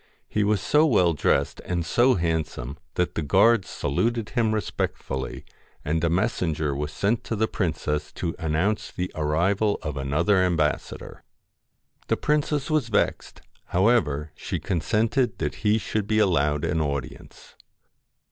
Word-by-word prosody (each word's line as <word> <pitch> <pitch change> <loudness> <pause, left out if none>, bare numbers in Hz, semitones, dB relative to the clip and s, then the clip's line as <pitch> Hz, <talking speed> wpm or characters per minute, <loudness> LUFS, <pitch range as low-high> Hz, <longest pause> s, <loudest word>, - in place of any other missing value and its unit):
He 105 - 0
was 105 -2 +1
so 150 +8 +3
well 95 - +4
dressed 75 - 0
and 85 -2 -2
so 125 +6 +3
handsome, 80 -5 -2 0.2
that 90 - 0
the - - -2
guards 100 - +3
saluted 115 - -1
him 115 -3 +1
respectfully, 65 -10 -3 0.4
and 80 +2 0
a 85 - +3
messenger 80 -6 0
was 75 +1 -3
sent 105 +8 0
to 115 - -2
the 110 +1 +1
princess 75 -6 -2
to 85 -2 -3
announce 80 +7 0
the 90 0 -4
arrival 90 +7 +1
of 75 -3 -4
another 75 +9 +1
ambassador. 85 -5 -1 0.8
The - - +1
princess 150 0 0
was 155 -6 +1
vexed; 110 - -1 0.2
however 90 -8 +1
she - - -4
consented 110 - 0
that - - -3
he 105 0 +3
should 105 -1 -2
be 110 - +1
allowed 75 -8 +2
an 80 - 0
audience. 70 -3 -5
90 Hz, 140 wpm, -25 LUFS, 75-110 Hz, 0.8 s, well